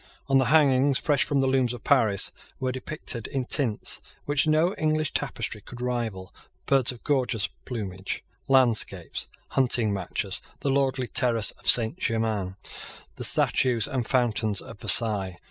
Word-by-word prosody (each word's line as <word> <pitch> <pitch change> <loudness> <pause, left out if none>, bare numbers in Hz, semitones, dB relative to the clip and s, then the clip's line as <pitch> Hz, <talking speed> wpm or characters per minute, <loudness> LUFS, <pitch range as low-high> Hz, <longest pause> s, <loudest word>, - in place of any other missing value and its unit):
On 135 -1 +3
the 130 - +2
hangings, 140 -1 +3
fresh 145 -1 +1
from 140 -2 +1
the 135 - +1
looms 130 -2 +1
of 120 - -13
Paris, 115 -9 +3 0.3
were 130 -1 -1
depicted, 130 -3 -4
in 135 -2 -3
tints 120 -6 0 0.2
which 145 +1 0
no 155 +4 +2
English 155 -2 -1
tapestry 105 - -3
could 120 +4 -11
rival, 115 -7 -4 0.3
birds 135 -3 +3
of 125 - -13
gorgeous 125 -7 0 0.2
plumage, 100 -6 -5 0.2
landscapes, 115 -9 +1 0.2
hunting 120 -5 +1
matches, 95 -3 -3 0.2
the 140 - 0
lordly 135 -1 0
terrace 120 -3 +3
of - - -12
Saint 120 +8 +3
Germains, 110 - -1 0.6
the - - -5
statues 120 -5 +3
and 125 -4 -3
fountains 115 -5 0
of 110 - -10
Versailles. 100 -6 +3
125 Hz, 145 wpm, -25 LUFS, 110-135 Hz, 0.6 s, On